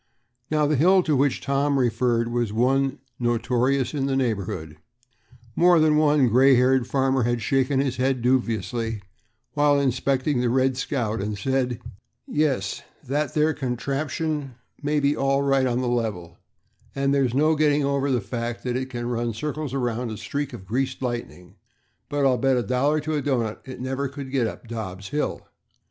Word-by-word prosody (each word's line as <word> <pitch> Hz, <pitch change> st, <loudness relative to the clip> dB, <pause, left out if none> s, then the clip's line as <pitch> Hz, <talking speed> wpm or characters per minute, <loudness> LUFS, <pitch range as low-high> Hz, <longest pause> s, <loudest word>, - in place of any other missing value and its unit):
Now, 150 Hz, -1 st, +2 dB
the 145 Hz, 0 st, +1 dB
hill 185 Hz, +6 st, +5 dB
to 155 Hz, -3 st, +1 dB
which 140 Hz, 0 st, +1 dB
Tom 140 Hz, +1 st, +1 dB
referred 120 Hz, -1 st, +1 dB
was 120 Hz, -3 st, -1 dB
one 135 Hz, +4 st, +1 dB, 0.2 s
notorious 125 Hz, +2 st, +1 dB
in 135 Hz, -2 st, -1 dB
the 135 Hz, -, 0 dB
neighborhood. 100 Hz, -, -2 dB, 0.8 s
More 175 Hz, 0 st, +5 dB
than 155 Hz, -1 st, +4 dB
one 150 Hz, -3 st, +4 dB
gray 130 Hz, +4 st, +5 dB
haired 125 Hz, 0 st, +3 dB
farmer 135 Hz, 0 st, +1 dB
had 120 Hz, 0 st, 0 dB
shaken 135 Hz, +3 st, +1 dB
his 135 Hz, -2 st, -1 dB
head 130 Hz, -1 st, 0 dB
dubiously 115 Hz, -3 st, 0 dB, 0.5 s
while 145 Hz, -1 st, +3 dB
inspecting 135 Hz, 0 st, 0 dB
the 125 Hz, -, +1 dB
"Red 130 Hz, +1 st, +2 dB
Scout," 120 Hz, -6 st, -2 dB
and 105 Hz, +1 st, -3 dB
said, 125 Hz, +2 st, -1 dB, 0.5 s
"Yes, 135 Hz, -10 st, -1 dB, 0.3 s
that 145 Hz, +3 st, -1 dB
there 155 Hz, +1 st, +3 dB
contraption 140 Hz, +2 st, -3 dB, 0.3 s
may 150 Hz, +1 st, +1 dB
be 145 Hz, +1 st, +2 dB
all 135 Hz, 0 st, +1 dB
right 135 Hz, -1 st, +2 dB
on 125 Hz, 0 st, 0 dB
the 125 Hz, -, -1 dB
level, 105 Hz, -9 st, -2 dB, 0.6 s
and 140 Hz, 0 st, +1 dB
there's 130 Hz, -3 st, +1 dB
no 155 Hz, +3 st, +3 dB
getting 150 Hz, -1 st, +2 dB
over 140 Hz, 0 st, 0 dB
the 125 Hz, -3 st, +1 dB
fact 115 Hz, +3 st, -4 dB
that 125 Hz, -1 st, -2 dB
it 130 Hz, +1 st, -2 dB
can 120 Hz, -1 st, -5 dB
run 120 Hz, -2 st, -2 dB
circles 150 Hz, +3 st, -4 dB
around 125 Hz, -2 st, -2 dB
a 110 Hz, -, -5 dB
streak 145 Hz, +4 st, -4 dB
of 95 Hz, -, -9 dB
greased 130 Hz, +6 st, -2 dB
lightning, 120 Hz, -7 st, -5 dB, 0.5 s
but 145 Hz, -1 st, 0 dB
I'll 130 Hz, -2 st, +3 dB
bet 135 Hz, -1 st, +2 dB
a 120 Hz, -, 0 dB
dollar 140 Hz, +7 st, +1 dB
to 155 Hz, +1 st, -3 dB
a 150 Hz, -, 0 dB
doughnut 120 Hz, -6 st, -2 dB
that 130 Hz, -, -8 dB
it -, -, -7 dB
could -, -, -10 dB
never 135 Hz, +2 st, -2 dB
get 135 Hz, -3 st, -2 dB
up 115 Hz, -, -8 dB
Dobb's 100 Hz, -4 st, -6 dB
hill." 150 Hz, +1 st, -3 dB
130 Hz, 175 wpm, -24 LUFS, 120-140 Hz, 0.8 s, hill